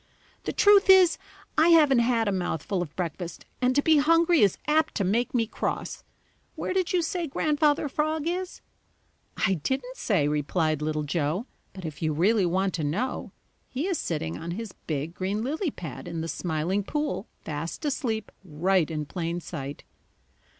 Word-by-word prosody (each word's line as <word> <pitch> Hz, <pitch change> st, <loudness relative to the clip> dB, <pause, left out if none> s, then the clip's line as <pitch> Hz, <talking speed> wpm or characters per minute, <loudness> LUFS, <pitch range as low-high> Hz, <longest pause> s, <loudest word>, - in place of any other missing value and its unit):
"The -, -, -1 dB
truth 405 Hz, -1 st, +5 dB
is, 375 Hz, -3 st, +7 dB, 0.4 s
I 320 Hz, -, +6 dB
haven't 300 Hz, -7 st, +6 dB
had 235 Hz, -2 st, +2 dB
a -, -, +2 dB
mouthful 180 Hz, 0 st, -2 dB
of 160 Hz, -4 st, -6 dB
breakfast 175 Hz, 0 st, -5 dB, 0.2 s
and 255 Hz, 0 st, +2 dB
to 285 Hz, -, +3 dB
be 315 Hz, -1 st, +5 dB
hungry 330 Hz, +2 st, +4 dB
is 200 Hz, -3 st, +4 dB
apt 310 Hz, +1 st, +2 dB
to 200 Hz, -, +1 dB
make 230 Hz, +7 st, 0 dB
me 230 Hz, -2 st, +3 dB
cross. 220 Hz, -, -4 dB, 0.5 s
Where -, -, -3 dB
did 370 Hz, -2 st, 0 dB
you 355 Hz, -2 st, +2 dB
say 340 Hz, 0 st, -2 dB
Grandfather 295 Hz, +1 st, +1 dB
Frog 310 Hz, +2 st, -1 dB
is?" 365 Hz, +1 st, -3 dB, 0.8 s
"I 195 Hz, -, +2 dB
didn't 260 Hz, -, -2 dB
say," 175 Hz, -10 st, +1 dB
replied 150 Hz, +1 st, 0 dB
Little 155 Hz, 0 st, -1 dB
Joe, 155 Hz, -, -1 dB, 0.3 s
"but 190 Hz, -3 st, -9 dB
if 155 Hz, -3 st, -7 dB
you 155 Hz, -1 st, +1 dB
really 190 Hz, +5 st, +3 dB
want 190 Hz, +2 st, 0 dB
to 160 Hz, -, -2 dB
know, 205 Hz, -, -2 dB, 0.4 s
he 270 Hz, +6 st, -2 dB
is 375 Hz, -3 st, -1 dB
sitting 85 Hz, -, -3 dB
on 170 Hz, -, -6 dB
his 225 Hz, -3 st, -5 dB, 0.2 s
big 155 Hz, +1 st, -2 dB
green 195 Hz, +4 st, -2 dB
lily 310 Hz, +7 st, -1 dB
pad 170 Hz, -, -8 dB
in 170 Hz, -1 st, -4 dB
the 165 Hz, -, -3 dB
Smiling 175 Hz, +4 st, -1 dB
Pool 295 Hz, -2 st, -2 dB
fast 160 Hz, -, -5 dB
asleep 235 Hz, -7 st, -2 dB
right 180 Hz, +1 st, +1 dB
in 155 Hz, -2 st, -3 dB
plain 170 Hz, +2 st, -3 dB
sight." 145 Hz, -5 st, -7 dB
200 Hz, 170 wpm, -27 LUFS, -, 0.8 s, is